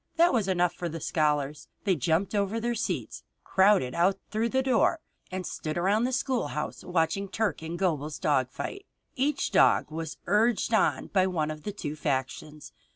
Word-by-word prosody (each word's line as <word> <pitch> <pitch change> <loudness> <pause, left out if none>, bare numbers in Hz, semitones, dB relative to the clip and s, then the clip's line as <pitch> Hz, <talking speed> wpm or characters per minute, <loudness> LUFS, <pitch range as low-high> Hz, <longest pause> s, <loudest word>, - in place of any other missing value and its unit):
That 340 -1 +4
was 220 -6 +1
enough 180 -2 +2
for 175 - -4
the 165 +1 -5
scholars. 150 -3 0 0.2
They 195 -3 +2
jumped 165 - 0
over 205 +2 0
their 240 +1 -1
seats, 230 - -3 0.2
crowded 190 -10 +3
out 185 +3 +2
through 220 +2 0
the 265 +1 +1
door, 260 +5 +2 0.3
and 185 0 -4
stood 155 -1 -4
around 200 +6 +2
the 255 - -1
schoolhouse 250 - -2
watching 180 +2 0
Turk 205 -6 -1
and 165 +2 -5
Gobel's 155 -5 -1
dog 130 -4 +1
fight. 400 - -6 0.3
Each 280 +2 0
dog - - +4
was 160 0 -5
urged 225 +2 +2
on 220 - +2
by 190 -2 +4
one 155 -4 -1
of 155 0 -7
the 205 - -4
two 155 -7 -5
factions. 145 +1 -3
185 Hz, 175 wpm, -28 LUFS, 155-220 Hz, 0.3 s, That